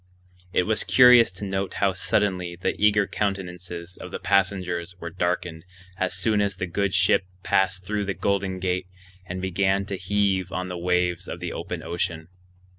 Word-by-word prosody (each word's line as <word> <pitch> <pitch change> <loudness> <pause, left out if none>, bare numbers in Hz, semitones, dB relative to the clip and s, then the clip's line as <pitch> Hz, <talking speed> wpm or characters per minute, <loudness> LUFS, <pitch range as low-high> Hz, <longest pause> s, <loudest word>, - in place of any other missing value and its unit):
It 90 - +2
was 110 +3 0
curious 125 -4 +7
to 95 +2 -6
note 95 0 -2
how 100 -1 +2
suddenly 90 -2 0
the - - 0
eager 105 -1 +5
countenances 90 -3 -4
of 90 - -8
the - - -4
passengers 90 -2 0
were 85 -1 -6
darkened 90 -1 -2 0.3
as 95 -1 0
soon 105 +3 +1
as 100 -1 0
the 90 - -3
good 100 +3 -1
ship 95 +1 +3 0.2
passed 95 -1 +1
through 105 +1 -1
the 100 -1 -2
Golden 100 -2 0
Gate 90 0 -1 0.4
and 90 +1 -4
began 95 +1 +1
to 100 -1 -4
heave 95 -1 0
on 90 0 -3
the 90 - -4
waves 90 0 0
of 85 - -6
the 90 -1 -4
open 85 0 -5
ocean. 85 -1 -3
95 Hz, 175 wpm, -25 LUFS, 90-100 Hz, 0.4 s, curious